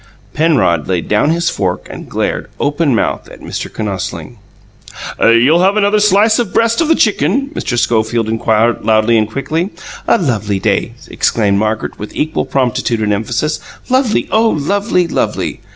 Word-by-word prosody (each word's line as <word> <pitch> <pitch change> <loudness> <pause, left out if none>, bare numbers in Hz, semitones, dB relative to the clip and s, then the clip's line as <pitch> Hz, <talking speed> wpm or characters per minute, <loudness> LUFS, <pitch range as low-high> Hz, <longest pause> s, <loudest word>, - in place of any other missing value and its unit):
Penrod 135 - +2
laid 90 -3 -1
down 105 +8 +2
his 170 +1 +1
fork 90 -3 -2
and - - -10
glared, - - -2
open 145 -2 +1
mouthed - - -2
at - - -13
Mr. - - -6
Kinosling. 100 -5 -5 0.8
"You'll 125 +9 +5
have 195 +3 +3
another 210 0 +3
slice 210 +2 +3
of 230 -6 -1
breast 230 +5 +2
of 325 - +1
the 325 - +4
chicken?" 220 - +1
Mr. 120 - -3
Schofield 115 -1 +1
inquired, 115 +1 +1
loudly 110 +1 +3
and 110 -1 +2
quickly. 155 - -2 0.4
"A - - +4
lovely 110 - -1
day!" - - -1
exclaimed 100 -3 +1
Margaret, 110 +1 -2
with 105 - -8
equal 155 +1 -1
promptitude 125 -3 -1
and 105 -1 +1
emphasis. 115 +9 -2 0.3
"Lovely, 255 -3 +1
oh, 225 +1 +3
lovely! 180 +3 0
Lovely!" - - -2
135 Hz, 155 wpm, -14 LUFS, -, 0.8 s, You'll